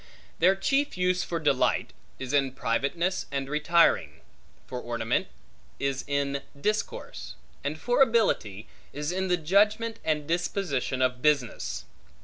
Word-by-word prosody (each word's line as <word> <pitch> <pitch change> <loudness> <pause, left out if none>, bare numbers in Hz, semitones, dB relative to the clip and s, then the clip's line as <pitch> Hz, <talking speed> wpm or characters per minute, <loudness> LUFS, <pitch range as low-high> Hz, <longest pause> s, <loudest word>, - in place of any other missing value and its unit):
Their 185 +3 +5
chief 275 +6 0
use 180 0 +1
for 170 - -3
delight, 145 -5 +1 0.2
is 130 +1 -5
in 135 -2 +2
privateness 140 +9 -1
and 135 -1 -2
retiring; 155 +4 +2 0.4
for 125 -1 -5
ornament, 115 -1 -1 0.5
is 135 -1 -1
in 140 -1 0 0.2
discourse; 210 - -3 0.3
and 150 +2 -2
for 245 - +1
ability, 205 - +2 0.3
is 150 +2 -3
in 190 +1 -1
the 180 -1 +2
judgment, 210 +7 +2
and 150 -2 0
disposition 165 -7 -1
of 125 0 0
business. 140 -6 0
150 Hz, 130 wpm, -27 LUFS, 135-185 Hz, 0.5 s, Their